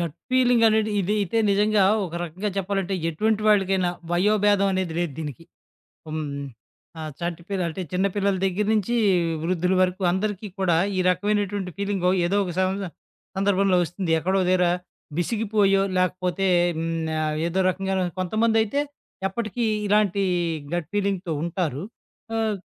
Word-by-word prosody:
Gut 170 -3 -3 0.2
ఫీలింగనేది 230 -4 +4
ఇదయితే 205 +2 0
నిజంగా 205 0 +3 0.2
ఒక 165 - -11
రకంగా 180 +5 -4
చెప్పాలంటే 195 0 -1
ఎటువంటి 215 +6 0
వాళ్ళికైనా 195 -3 +3 0.2
వయోభేదం 205 +1 +3
అనేది 185 -3 -1
లేదు 175 -4 -1
దీనికి. 155 +1 -6 0.6
హ్మ్. 155 -1 -3 0.7
ఆ - - -5 0.2
చంటిపిల్ల 175 +3 -3
అంటే 185 +4 -5
చిన్న 185 +2 +1
పిల్లల 200 -1 +1
దెగ్గర 195 +2 0
నించి 220 +2 0 0.5
వృద్ధులు 180 +2 +1
వరకు 185 +1 0
అందరికీ 205 +2 -2
కూడా 180 -3 +2 0.2
ఈ - - +1
రకమైనటువంటి 205 0 0
ఫీలింగొ 195 -3 0
ఏదో 195 +4 +1
ఒక 180 -2 -4
సంవస 190 +1 0 0.5
సందర్భంలో 195 -1 +3
ఒస్తుంది. 175 +1 -3
ఎక్కడో 190 +4 0
ఒ - - -1
దెగ్గరా 180 -1 +3 0.5
విసిగిపోయో, 200 0 +2 0.2
లాకపోతే 185 +1 0 0.3
హ్మ్. 165 - -2 0.4
ఆహ్, 155 0 -1
ఏదో 180 +3 -1
రకంగాైను 190 -1 -1
కొంతమందైతే 220 +5 +1 0.5
ఎప్పటికి 225 +3 -3 0.2
ఇలాంటి 205 -1 +2 0.5
గట్ 175 -3 -2
ఫీలింగ్‌తో 195 -4 -1
ఉంటారు. 165 -4 -2 0.5
ఆహ్, 220 -2 0
195 Hz, 130 wpm, -24 LUFS, 180-205 Hz, 0.7 s, ఫీలింగనేది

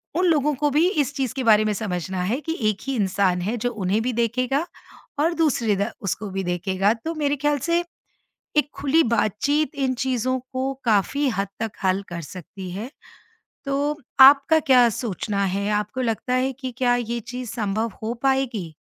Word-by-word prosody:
उन 360 +2 +2
लोगों 300 -3 +2
को 295 +2 +1
भी 315 +5 +4
इस 290 - 0
चीज़ 265 -3 -1
के 260 - -2
बारे 215 -1 +5
में 215 - +1
समझना 185 -3 -3
है 225 +9 -1
कि 325 +2 -3
एक 210 - -2
ही 270 - -1
इंसान 190 -3 +1
है 215 +6 -1
जो 245 +2 -1
उन्हें 205 0 0
भी 250 +1 -1
देखेगा 250 +6 0 0.5
और 330 +3 +2
दूसरे 245 -10 +2
द 200 +4 -1
उसको 205 0 -3
भी 195 0 -2
देखेगा 190 +4 +1
तो 330 - -1
मेरे 290 -2 0
ख़्याल 295 +1 +1
से, 340 +4 +1 0.7
एक 295 -1 +3
खुली 295 +4 +2
बातचीत 235 +8 +1
इन 265 -2 0
चीज़ों 255 0 -1
को 260 +1 -1
काफ़ी 230 +7 +2
हद 195 -3 -2
तक 225 -2 -2
हल 190 +1 +2
कर 170 -1 -5
सकती 185 +3 -9
है। 215 +7 -6 0.8
तो 285 +2 -1 0.2
आपका 280 +4 +8
क्या 255 -5 +5
सोचना 205 -2 -2
है? 200 +2 -1
आपको 210 +5 -1
लगता 240 +1 -1
है 260 +1 +1
कि 260 0 -6
क्या 245 -2 +3
ये 235 0 -2
चीज़ 250 +1 -7
संभव 220 0 -2
हो 225 +2 -1
पाएगी? 250 -11 0
240 Hz, 185 wpm, -23 LUFS, 205-275 Hz, 0.8 s, आपका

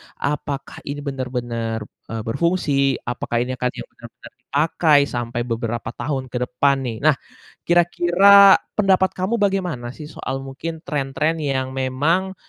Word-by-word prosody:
apakah 140 -1 -4
ini 145 +1 -4
benar-benar, 120 -5 -3 0.2
eee, 115 0 -4
berfungsi? 140 0 +1
Apakah 120 0 -2
ini 125 - -5
akan 125 0 0
yang - - -7
benar-benar 120 0 -14
dipakai, 150 +3 +2
sampai 120 -3 -3
beberapa 115 -1 -3
tahun 130 +1 -4
ke 125 - -2
depan 140 +3 +2
nih? 120 -4 -4
Nah, 155 -1 +5 0.5
kira-kira 175 +3 +6 0.2
pendapat 190 -2 +2
kamu 195 +6 -1
bagaimana 180 -12 -1
sih 150 0 -9
soal 135 0 -5
mungkin 160 +5 -7
tren-tren 150 +2 -1
yang 135 -3 -1
memang, 145 +9 0
140 Hz, 135 wpm, -21 LUFS, 125-165 Hz, 0.5 s, kira-kira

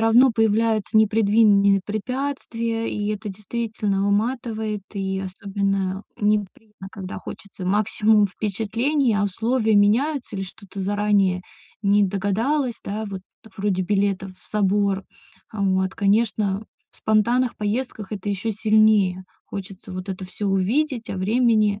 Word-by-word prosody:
равно 235 +3 +6
появляются 220 -1 +1
непредвиденные 205 -2 +4
препятствия, 230 0 -3
и 205 0 -2
это 210 0 -5
действительно 210 0 -2
выматывает, 220 -1 -1
и 190 -1 -2
особенно 195 0 -2 0.2
неприятно, 210 -1 -2
когда 190 -1 -7
хочется 195 -2 -8
максимум 210 +1 +3
впечатлений, 225 +7 0
а 205 0 +2
условия 220 +2 +1
меняются 245 +8 +2
или 195 - -2
что-то 195 +1 -9
заранее 200 -2 +1 0.4
не 205 0 +4
догадалась, 225 +8 0
да, 215 +2 -4
вот 195 -2 -6 0.4
вроде 195 -2 0
билета 195 0 0
в - - -19
собор. 200 -1 +1 0.5
А, 215 - -6
вот, 190 -1 +1
конечно, 205 -1 +1 0.3
в - - -18
спонтанных 235 +3 +2
поездках 215 -1 -3
это 205 0 -3
еще 200 +3 -2
сильнее 210 -3 +3 0.2
хочется 195 -1 -8
вот 185 +1 -6
это 190 -1 -4
всё 205 +3 -5
увидеть, 225 +6 0
а - - -3
времени 215 0 +2
205 Hz, 125 wpm, -23 LUFS, 195-225 Hz, 0.5 s, равно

